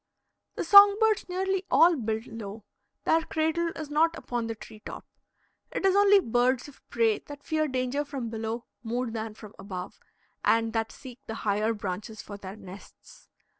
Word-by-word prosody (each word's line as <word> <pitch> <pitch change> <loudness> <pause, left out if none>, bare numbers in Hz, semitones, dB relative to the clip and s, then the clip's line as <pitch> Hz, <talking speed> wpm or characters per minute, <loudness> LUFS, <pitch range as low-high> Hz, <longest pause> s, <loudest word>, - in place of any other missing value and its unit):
The - - -2
song 400 +3 +9
birds 440 -4 +2
nearly 380 +1 -1
all 340 +1 +6
build 220 -3 -2
low; 220 -2 -8 0.4
their 325 - +3
cradle 320 +1 0
is 305 -2 -7
not 325 +2 +2
upon 240 -2 -3
the 225 - -4
tree 215 0 -13
top. - - -8 0.6
It - - -3
is 385 0 +4
only 405 0 +6
birds 245 -3 +1
of 290 - -15
prey 225 -2 +2
that 285 -1 -11
fear 310 -1 0
danger 260 +1 -1
from 275 -5 -5
below 225 +1 -4 0.2
more 240 +1 -2
than 220 -1 -5
from 215 -1 -12
above, 185 -2 -7 0.4
and 225 0 +2
that 225 -1 -1
seek 255 -2 -11
the 220 - -4
higher 210 +2 +1
branches 205 +1 -5
for 205 - -8
their 195 -1 -8
nests. 195 -2 -14
240 Hz, 170 wpm, -28 LUFS, 220-315 Hz, 0.6 s, song